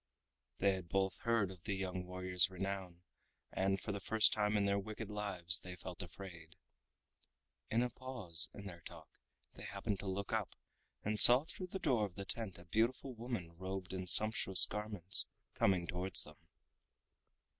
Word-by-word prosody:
They 100 0 +2
had 90 -3 -8
both 95 -1 -1
heard 115 -5 0
of 90 -2 -14
the 100 - -2
young 90 -1 -5
warrior's 90 0 +1
renown, 95 -2 -6 0.5
and 95 +1 -1
for 105 - -6
the 100 - -5
first 110 +2 +3
time 105 0 0
in 100 - 0
their 100 0 0
wicked 110 +1 -8
lives 95 -5 +1
they 90 0 -10
felt 90 0 -9
afraid. 85 -2 -11 1.1
In 115 +2 +1
a 125 - -2
pause 115 -10 -1
in 100 - -12
their 85 -3 -10
talk 80 -3 -11 0.4
they - - -14
happened 100 -2 -4
to 100 - -7
look 100 +3 -4
up, 110 -3 -3 0.5
and 105 +1 -1
saw 125 +3 +11
through 180 +3 -8
the 185 - -6
door 130 - 0
of 90 - -20
the 100 - -7
tent 110 -3 -5
a 85 - -15
beautiful 115 +8 -1
woman 115 -8 -7
robed 95 0 -6
in 95 -1 -6
sumptuous 105 -1 +6
garments 105 -3 0 0.3
coming 95 -3 +1
towards 90 +2 0
them. - - -15
95 Hz, 170 wpm, -35 LUFS, 90-110 Hz, 1.1 s, saw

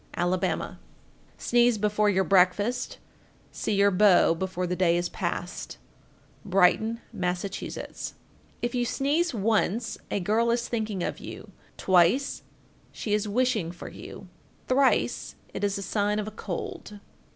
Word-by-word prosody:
Alabama. 175 +1 -1 0.6
1432. - - -9
Sneeze 240 -1 +4
before 210 0 +2
your 190 -1 +2
breakfast, 200 +6 +2 0.5
See 215 - -2
your 200 0 +4
beau 185 -3 +5
before 185 +1 -3
the 180 0 -1
day 175 -2 +3
is 175 0 -1
past. 175 0 -4 0.7
Brighton, 210 +4 +3
Mass. 180 -3 -1
1433. 200 0 -6 0.5
If 240 - -1
you 245 -1 +1
sneeze 285 +5 0
once, 220 +2 0
a - - 0
girl 220 +5 +1
is 235 0 0
thinking 215 -5 -2
of - - -3
you; - - -9 0.3
twice, 185 +10 +3 0.5
she 210 - -3
is 210 0 +1
wishing 220 -5 +1
for 175 - -9
you; - - -10 0.4
thrice, 265 +1 +2 0.2
it - - -5
is 200 -1 +1
a 200 - -4
sign 205 +1 0
of 210 0 -2
a - - -5
cold. 205 +1 -6
205 Hz, 140 wpm, -27 LUFS, 185-230 Hz, 0.7 s, beau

